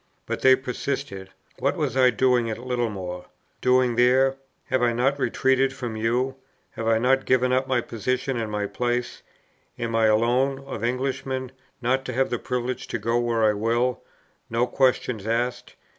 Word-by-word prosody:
But - - -4
they 130 0 +7
persisted: 130 -6 -4 0.3
"What - - 0
was - - -1
I 130 -1 +5
doing 125 0 +2
at 110 - -3
Littlemore?" 110 -8 -3 0.4
Doing 125 -2 +3
there! 130 +2 +4 0.4
have 130 - +2
I 120 -1 +3
not 135 +4 +1
retreated 130 0 +2
from 125 -4 -5
you? 125 +4 0 0.3
have 115 - -5
I 115 0 +4
not 130 +3 +2
given 125 0 +3
up 130 +1 +1
my 130 -2 +1
position 125 +4 -2
and 110 -2 -3
my 105 -1 -1
place? 120 +3 -2 0.6
am 115 -1 -3
I 110 -1 +4
alone, 120 +5 +2
of 110 - -6
Englishmen, 130 +1 -2 0.3
not 130 +2 +1
to 130 - -4
have 130 +2 0
the 120 - -1
privilege 125 0 -3
to - - -2
go 115 +1 0
where 120 -2 0
I 105 -1 +4
will, 120 +4 0 0.5
no 115 +2 +1
questions 125 -5 0
asked? 120 +2 -2
125 Hz, 170 wpm, -24 LUFS, 115-130 Hz, 0.6 s, they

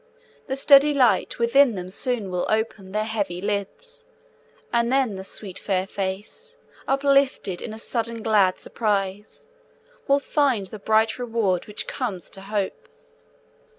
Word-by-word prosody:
The 265 - -2
steady 280 +2 +6
light 240 -8 +2
within 240 +1 +4
them 180 0 -6
soon 225 -3 -2
will 180 -1 -1
ope 220 +1 +1
Their 200 +1 -4
heavy 205 -5 -3
lids, 205 - -4 0.7
and 235 0 +2
then 260 -6 +2
the 190 - -6
sweet 195 -1 -6
fair 190 -2 -1
face, 200 - -5 0.3
Uplifted 275 -8 +2
in - - -6
a 220 - -7
sudden 230 0 -3
glad 205 -5 +3
surprise, 205 -2 -3 0.6
Will 280 0 +4
find 275 -8 +1
the 210 +3 -8
bright 220 +3 +2
reward 225 -7 -1
which 210 - -3
comes 210 -9 -4
to 195 - -8
Hope. 205 - -3
220 Hz, 140 wpm, -24 LUFS, 195-255 Hz, 0.7 s, steady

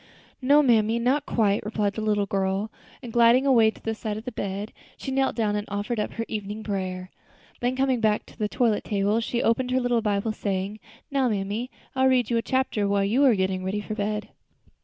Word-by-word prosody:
"No, 285 +3 +5
mammy, 225 -3 +3
not 260 +5 +1
quite," 210 -3 +1
replied 210 -1 -1
the 220 - -4
little 210 -1 +1
girl, 195 +2 -1 0.3
and 235 -2 -8
gliding 235 +3 +5
away 235 -5 +5
to - - -9
the 225 - -1
side 215 -1 -4
of 220 - -8
the 250 - -4
bed, 200 -1 -4 0.2
she 270 - -5
knelt 270 0 +1
down 215 -3 0
and 210 0 -3
offered 205 +3 -2
up 210 - -2
her 230 - -3
evening 210 0 -5
prayer. 185 -3 -4 0.5
Then, 245 +1 0
coming 265 -2 +1
back 215 -1 +1
to - - -18
the 210 -1 0
toilet 230 -4 +1
table, 205 +1 +1
she 235 +1 -1
opened 250 +2 +1
her 255 +1 +2
little 245 -2 +1
Bible, 210 0 0
saying, 200 0 -3 0.3
"Now, 270 -3 +2
mammy, 210 +4 -2 0.3
I 260 - 0
will 265 - +5
read 250 -3 +2
you 235 - +2
a - - +2
chapter 260 -5 0
while 200 0 +2
you 240 +8 +2
are 250 -5 +5
getting 190 -1 -1
ready 190 +2 -2
for 210 +1 -5
bed." 210 0 -2
220 Hz, 220 wpm, -25 LUFS, 205-245 Hz, 0.5 s, No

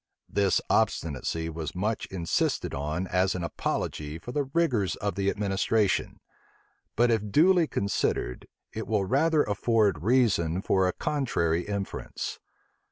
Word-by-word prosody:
This 100 -2 +2
obstinacy 80 +2 0
was 80 -1 -5
much 105 +4 -1
insisted 85 -3 -1
on 75 +6 -2
as 95 +1 +1
an 90 - -3
apology 75 -2 -3
for 120 - -8
the 145 +2 0
rigors 130 - +1
of 100 0 -2
the 100 0 0
administration: 100 +1 0 0.8
but 120 +1 +3
if 105 -2 0
duly 170 - +5
considered, 100 - -1 0.3
it 110 - -5
will 105 -3 +1
rather 150 - +3
afford 105 -4 +1
reason 95 -6 +2
for 95 -1 +2
a - - +1
contrary 90 - 0
inference. 100 -1 -4
100 Hz, 130 wpm, -27 LUFS, 85-115 Hz, 0.8 s, duly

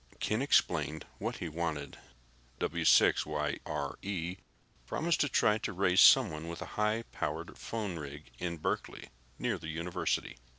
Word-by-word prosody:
Ken 110 +4 0
explained 80 - +2
what - - -2
he - - -4
wanted. 80 -3 -4 0.6
W6YRE 80 +4 +1 0.5
promised 170 +1 0
to 145 - +2
try 105 -3 +3
to 105 - -3
raise 90 0 +4
someone 85 -12 +6
with 85 0 -6
a - - -10
high 105 +2 +1
powered - - -4
phone 105 -7 -4
rig 70 -2 -9
in 85 -1 -3
Berkeley, 75 - -3 0.3
near - - -1
the 80 - -7
university. 85 -1 -2
85 Hz, 130 wpm, -32 LUFS, 80-105 Hz, 0.6 s, someone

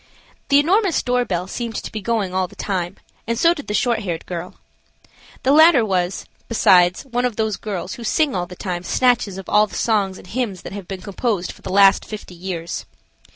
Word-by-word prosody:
The 280 - +6
enormous 375 +4 +2
door 250 0 +1
bell 180 -3 -2
seemed 230 +3 -5
to - - -5
be 215 - -5
going 210 -4 -1
all 185 0 0
the - - -17
time, 185 -2 -3 0.3
and 230 0 -1
so 335 +6 +4
did 290 -5 -9
the 210 - -1
short 240 -2 +1
haired 175 -6 -4
girl. 175 0 -6 0.9
The 265 - +3
latter 310 -5 +7
was, 185 -2 -1 0.2
besides, 180 -5 +4
one 245 -2 -2
of 250 -3 0
those 220 -2 0
girls 195 -3 -5
who 235 - -8
sing 290 +5 +1
all 175 -1 -2
the 180 - -10
time 180 -1 -4
snatches 235 -1 +1
of 195 - -8
all 210 0 +4
the - - -11
songs 200 -4 +1
and - - -13
hymns 210 -3 -3
that - - -8
have 200 -3 -7
been 190 -2 -7
composed 200 -2 -2
for - - -17
the - - -7
last 195 0 +5
fifty 215 -4 -8
years. 175 -1 -5
205 Hz, 210 wpm, -21 LUFS, 185-240 Hz, 0.9 s, latter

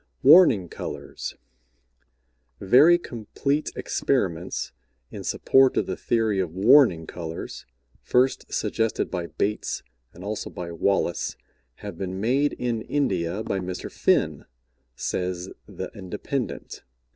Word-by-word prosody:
WARNING 125 - +7
COLORS. - - -6 1.2
Very 140 - +6
complete 140 +2 -2
experiments - - -1 0.4
in - - -7
support 135 0 +3
of - - +2
the 95 - -3
theory 110 -4 0
of 90 -3 -2
warning 100 - +5
colors, 80 -7 -7 0.3
first 130 +1 +1
suggested 115 -1 -1
by 90 -2 -3
Bates 105 +4 -2 0.3
and 90 - -12
also 105 +1 -4
by 85 -1 -6
Wallace, 85 -2 0 0.5
have - - -7
been 95 0 -4
made 135 +7 +2
in 120 -2 -2
India 100 -8 -1
by 100 - -2
Mr. 90 -1 -5
Finn, - - +1 0.5
says 90 +4 -3 0.2
The - - -7
Independent. 105 +7 -5
100 Hz, 110 wpm, -25 LUFS, 90-125 Hz, 1.2 s, WARNING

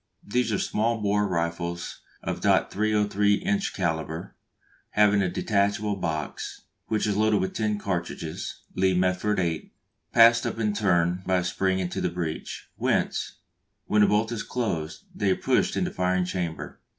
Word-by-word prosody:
These 120 +2 +1
are 105 - +1
small 115 +4 0
bore 105 0 +1
rifles 85 -1 -3 0.2
of - - -3
.303 105 -1 +2
inch 200 0 0
calibre, 80 -3 -2 0.6
having 105 -1 +4
a 95 - +1
detachable 100 +1 0
box, 80 -6 -4 0.3
which 110 -1 0
is 105 -2 0
loaded 110 0 +3
with 95 - -2
ten 105 -1 0
cartridges 85 -5 -4
(Lee 95 0 +2
Metford 90 +3 +1
eight) 85 -3 -2 0.4
passed 115 0 +6
up - - -4
in 105 -2 0
turn 90 -4 +2
by 95 - +3
a 90 - +2
spring 95 +2 0
into 90 -1 -2
the - - +1
breech, 85 -2 -5
whence, - - 0 0.5
when 105 - +3
the 105 - +6
bolt 110 +2 +2
is 115 - -2
closed, 95 -11 -3
they 100 - 0
are 95 - +4
pushed - - +1
into - - 0
the - - -19
firing 90 0 +1
chamber. 90 -3 -4
100 Hz, 160 wpm, -26 LUFS, 90-105 Hz, 0.6 s, passed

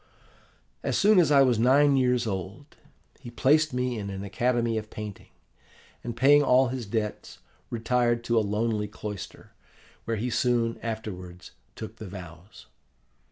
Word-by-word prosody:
"As - - -1
soon 210 -1 +5
as 160 -4 +3
I 140 -1 +6
was 125 -4 +2
nine 140 +4 +4
years 125 -2 +2
old, 100 - -6 0.4
he - - -10
placed 150 +6 +2
me 125 -2 -2
in 100 -1 -5
an 95 0 -6
academy 115 +2 0
of 110 0 -10
painting, 105 -2 -8 0.7
and, 120 -1 -6
paying 145 +4 +6
all 130 -2 +4
his 125 -4 -5
debts, 105 0 -4 0.3
retired 120 0 0
to 115 -1 +2
a - - +2
lonely 105 +1 -1
cloister, 105 -2 -8 0.5
where 115 -1 -2
he 120 +4 -2
soon 115 -1 0
afterwards 95 -6 -7 0.2
took 110 0 -8
the 110 - -8
vows. 90 0 -11
115 Hz, 150 wpm, -26 LUFS, 105-125 Hz, 0.7 s, I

